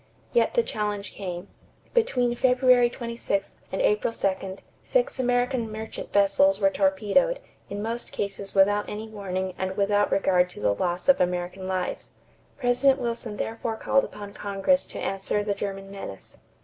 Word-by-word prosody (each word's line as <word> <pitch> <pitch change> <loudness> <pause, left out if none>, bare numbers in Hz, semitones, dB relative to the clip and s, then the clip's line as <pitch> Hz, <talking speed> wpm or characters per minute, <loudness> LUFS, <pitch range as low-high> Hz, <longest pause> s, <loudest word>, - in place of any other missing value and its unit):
Yet 480 - +3
the 475 - +4
challenge 210 - -3
came. 180 -1 -5 0.5
Between 255 - +2
February 250 0 +4
26 235 -5 -3 0.2
and 190 - -1
April 210 +2 +2
2, 190 -3 -2 0.3
six - - 0
American 245 -2 +1
merchant 220 +1 -6
vessels 195 -1 +4
were 195 -2 +4
torpedoed, 200 - +2 0.3
in 205 +1 -4
most 230 +2 -3
cases 200 -1 -4
without 205 +2 +4
any 215 +1 -5
warning 190 -3 -3
and 190 +1 -2
without 205 0 +2
regard 180 -2 +3
to - - -11
the 105 -1 +2
loss 175 - -2
of 275 - +5
American 180 +1 -1
lives. 185 -1 -3 0.4
President 265 +1 +3
Wilson 230 -3 -3
therefore 225 +1 -3
called 270 +4 +2
upon 205 -1 -8
Congress 205 +8 +1
to - - -8
answer 195 +1 -1
the 205 -1 0
German 195 -1 -5
menace. 195 - -8
205 Hz, 150 wpm, -26 LUFS, 195-240 Hz, 0.5 s, of